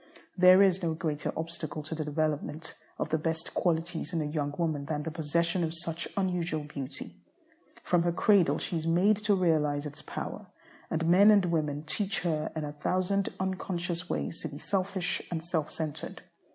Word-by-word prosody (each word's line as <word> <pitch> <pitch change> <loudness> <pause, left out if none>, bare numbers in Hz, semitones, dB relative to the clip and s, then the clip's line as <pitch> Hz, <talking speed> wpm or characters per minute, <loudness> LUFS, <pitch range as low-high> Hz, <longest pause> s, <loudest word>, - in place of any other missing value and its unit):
There 185 +1 +8
is 190 -1 +3
no 165 -2 0
greater 155 -2 -2
obstacle 160 -1 -4
to 155 - -4
the 160 -1 -2
development 155 +1 -2 0.2
of - - -2
the 160 0 +1
best 160 +1 -2
qualities 170 0 -1
in 165 - +1
a - - -3
young 145 -1 -1
woman 155 -4 -1
than 150 0 -2
the 160 - -4
possession 170 +3 0
of 160 0 0
such 165 0 -3
unusual 175 -5 0
beauty. 140 -3 -6 0.7
From 175 -1 +3
her 175 0 +2
cradle 170 -5 +4
she 170 - -2
is 160 0 -3
made 185 +5 +4
to 210 -1 +2
realize 155 -5 +2
its 145 -1 -6
power, - - -6 0.4
and 165 +1 0
men 185 +5 +7
and 205 -3 +6
women 155 -4 0
teach 195 +5 0
her 160 -3 -1
in 155 - -2
a 145 - -4
thousand 185 +6 0
unconscious 180 -2 -2
ways 165 - -2
to - - -3
be 145 -2 -8
selfish 190 +1 -1
and 165 -2 -3
self 160 -3 -1
centred. 155 -3 -5
165 Hz, 180 wpm, -30 LUFS, 155-180 Hz, 0.7 s, There